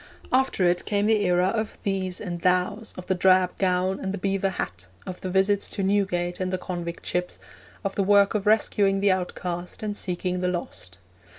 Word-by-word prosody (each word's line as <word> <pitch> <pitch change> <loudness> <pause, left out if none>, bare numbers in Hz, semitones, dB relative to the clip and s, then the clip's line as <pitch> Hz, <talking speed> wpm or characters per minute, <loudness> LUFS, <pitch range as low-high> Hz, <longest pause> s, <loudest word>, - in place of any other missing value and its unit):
After 255 -8 +3
it 175 0 +1
came 205 -1 +1
the 215 -1 +3
era 180 +1 +3
of 220 0 -3
'thees' 190 -2 -1
and 175 -4 -5
'thous,' 185 +5 +1
of 180 - -7
the 190 - +1
drab 185 0 +3
gown 185 0 +1
and 190 - -3
the 200 - -3
beaver 195 0 0
hat, 90 - -5 0.2
of 180 - -7
the 185 - -4
visits 195 +2 +2
to 195 - -3
Newgate 190 -3 0
and 185 -1 -1
the 185 - 0
convict 175 -2 -6
ships, 180 0 -2 0.5
of 195 - -2
the - - 0
work 200 0 +4
of 210 -1 -1
rescuing 205 -2 +3
the 200 0 +3
outcast 180 0 -4
and 210 -1 -2
seeking 180 -1 -2
the 180 - 0
lost. 170 - -5
185 Hz, 195 wpm, -25 LUFS, 180-200 Hz, 0.5 s, work